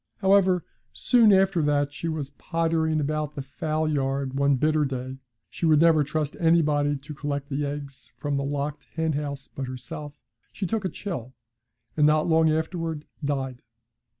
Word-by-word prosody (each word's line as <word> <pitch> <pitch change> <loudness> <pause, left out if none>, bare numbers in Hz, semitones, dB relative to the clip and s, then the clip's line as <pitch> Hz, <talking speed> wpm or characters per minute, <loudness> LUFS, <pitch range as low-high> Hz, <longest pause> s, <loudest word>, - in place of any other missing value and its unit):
However, 190 -3 +3 0.3
soon 235 -4 +4
after 190 -2 +4
that, 145 -1 +2
as - - -23
she 165 - -4
was 155 -4 -3
pottering 160 0 0
about 150 0 -2
the 140 - -4
fowl 155 +3 -2
yard 135 -2 -1
one 140 0 +3
bitter 155 +3 +2
day 130 -1 -4 0.3
she 170 - -2
would 155 -2 +5
never 160 -2 +5
trust 150 0 -2
anybody 150 -3 +3
to 145 +3 -9
collect 145 -1 -4
the 145 +1 -1
eggs 140 -2 -7
from 145 -1 -2
the 140 - 0
locked 145 +1 -3
henhouse 145 -3 -2
but 135 -1 -4
herself 140 +3 -7 0.3
she 200 - -4
took 210 +2 -1
a - - +1
chill, 130 - -6 0.6
and 150 -1 +4
not 155 +1 +3
long 160 -1 +4
afterwards 160 -1 -2 0.2
died. 135 -3 -2
150 Hz, 165 wpm, -26 LUFS, 140-160 Hz, 0.6 s, would